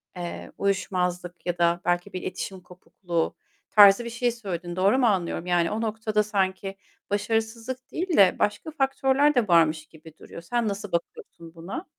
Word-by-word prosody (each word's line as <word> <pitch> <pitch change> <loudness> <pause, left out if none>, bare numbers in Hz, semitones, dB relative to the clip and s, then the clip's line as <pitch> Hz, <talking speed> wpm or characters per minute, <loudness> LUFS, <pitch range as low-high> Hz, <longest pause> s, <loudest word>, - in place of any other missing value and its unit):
eee, 175 -1 -6
uyuşmazlık 180 -2 -2
ya 175 -1 -2
da 170 0 +2
belki 175 +3 0
bir 185 - -4
iletişim 185 +1 -5
kopukluğu 175 -1 -4 0.4
tarzı 205 +2 +7
bir - - -4
şey 240 +1 0
söyledin. 180 -7 -6
Doğru 195 +6 +3
mu 260 - +3
anlıyorum? 180 -4 -1
Yani 175 -1 +1
o 215 +2 -2
noktada 220 -1 0
sanki 195 -2 -2 0.3
başarısızlık 225 +4 -2
değil 355 0 -2
de 195 -2 +6
başka 210 +10 -1
faktörler 270 +1 +2
de 240 -4 +2
varmış 165 -3 +3
gibi 160 -1 -15
duruyor. - - -10
Sen 235 +6 -1
nasıl 200 -1 -4
bakıyorsun 170 -1 -5
buna? 190 - -7
195 Hz, 160 wpm, -25 LUFS, 175-225 Hz, 0.4 s, tarzı